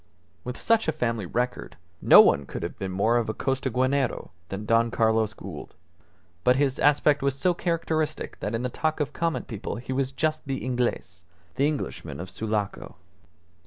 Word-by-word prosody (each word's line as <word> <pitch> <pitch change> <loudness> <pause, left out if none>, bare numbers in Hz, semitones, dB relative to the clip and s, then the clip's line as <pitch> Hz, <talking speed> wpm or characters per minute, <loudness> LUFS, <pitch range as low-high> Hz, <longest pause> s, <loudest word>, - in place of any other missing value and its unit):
With 125 0 -5
such 225 -3 +2
a - - +3
family 115 - -2
record, 125 -2 -3 0.2
no - - +9
one 70 -1 +3
could - - -5
be 95 - -2
more 100 +6 +2
of 115 -2 -1
a 110 - -2
Costaguanero 130 - 0 0.2
than 100 +2 -5
Don 115 +1 +3
Carlos 110 -2 +2
Gould; 95 -8 -9 0.7
but 125 - +5
his 135 -1 +1
aspect 145 0 +4
was 140 0 0
so 180 +6 +2
characteristic 160 -3 -2
that 105 - -2
in 115 - -2
the 125 - -1
talk 155 +5 -1
of 150 0 -2
common 165 -1 -1
people 110 -3 -5
he 125 +2 -5
was 135 0 0
just 155 +3 -1
the 135 -2 -3
Inglez 120 -8 -2 0.3
the 140 +2 +2
Englishman 150 - -4
of 95 +2 -7
Sulaco. 105 +1 -3
125 Hz, 170 wpm, -26 LUFS, 110-145 Hz, 0.7 s, no